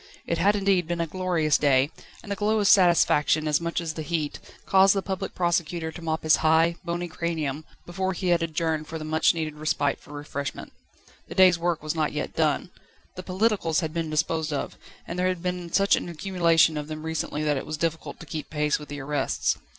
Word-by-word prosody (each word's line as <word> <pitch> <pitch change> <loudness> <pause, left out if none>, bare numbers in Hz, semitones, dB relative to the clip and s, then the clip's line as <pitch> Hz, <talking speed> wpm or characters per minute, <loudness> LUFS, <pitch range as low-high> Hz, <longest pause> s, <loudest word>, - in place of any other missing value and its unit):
It 170 - -1
had 200 +4 +4
indeed 195 -4 +2
been 175 0 -2
a 170 - +1
glorious 170 -3 +1
day, 140 0 +3 0.3
and 205 - -8
the - - 0
glow 215 +2 +1
of 205 - +1
satisfaction 160 -5 +4
as 150 +1 +2
much 170 0 -2
as 165 -2 -4
the 155 - -5
heat, 155 -2 -3 0.3
caused 195 +1 +5
the 195 - -1
Public 190 +1 -4
Prosecutors 170 -2 -1
to 175 - -9
mop 160 -1 -2
his 155 -1 +5
high, 160 +2 +3
bony 175 +1 -3
cranium 160 -3 -3 0.2
before 190 +2 -2
he 185 0 -2
had 170 -1 +3
adjourned 160 -1 -1
for 160 - -5
the 155 - -6
much 160 +2 +2
needed 155 -2 -3
respite 150 -2 0
for - - -16
refreshment. 145 -1 -6 0.5
The - - -8
day's 185 -2 +6
work 170 -2 -1
was 155 - -2
not 155 -2 -1
yet 150 - -4
done. 160 +2 0 0.4
The 185 - -6
"politicals" 185 -3 0
had 160 -2 -4
been 165 -1 -2
disposed 155 +1 0
of, 145 - -3 0.3
and 175 - -4
there 185 - +2
had 185 -2 -2
been 180 -1 -3
such 200 +2 +4
an - - -4
accumulation 165 -2 +2
of 150 0 -4
them 155 0 -6
recently 160 -1 -3
that 150 -2 +1
it - - -5
was 155 - -4
difficult 165 0 -3
to - - -9
keep 155 0 -6
pace 150 -1 0
with 150 - -11
the 145 -1 -6
arrests. 140 0 -1
165 Hz, 215 wpm, -25 LUFS, 155-180 Hz, 0.5 s, day's